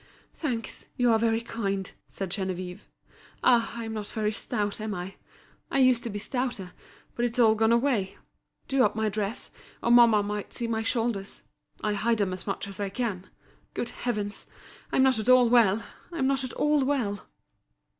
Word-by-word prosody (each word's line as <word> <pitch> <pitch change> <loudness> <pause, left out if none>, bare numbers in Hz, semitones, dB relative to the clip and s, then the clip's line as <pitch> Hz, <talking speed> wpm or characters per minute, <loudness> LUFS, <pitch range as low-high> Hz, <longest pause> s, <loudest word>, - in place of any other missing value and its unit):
"Thanks, 245 -8 -4
you 245 -2 +4
are 225 - +4
very 225 0 +2
kind," 200 -5 -3 0.2
said 195 -3 -4
Geneviève. 185 -1 -3 0.6
"Ah! 235 -2 +4
I'm 225 -1 -4
not 210 -2 -4
very 215 -1 -1
stout, 210 -2 -2
am 215 -1 -3
I? 180 +2 -5 0.6
I - - -1
used 255 -3 +5
to 235 - -4
be 205 - -4
stouter, 240 -4 -3 0.4
but 240 - -2
it's 240 0 -1
all 225 -3 +6
gone 220 +1 +2
away. 235 -6 +1 0.5
Do 270 -1 +3
up 210 0 +2
my 220 -1 +1
dress 210 +2 -3 0.3
or 235 - +2
mamma 235 -3 +7
might 205 0 -4
see 240 - -3
my 225 -1 -1
shoulders. 225 -3 -2 0.4
I 210 - +1
hide 225 +3 +1
them 200 -3 0
as 185 +2 -8
much 195 0 -2
as 195 -1 -9
I 200 -1 -1
can. 195 -4 -3 0.5
Good 235 - -2
heavens! 210 -4 -4 0.4
I'm 265 - +4
not 260 -4 +4
at 220 - -1
all 255 -1 +7
well, 225 -3 +4 0.3
I'm 335 -6 -1
not 270 0 +2
at 255 - -4
all 295 -1 +2
well." 245 -8 -1
225 Hz, 180 wpm, -27 LUFS, 205-245 Hz, 0.6 s, mamma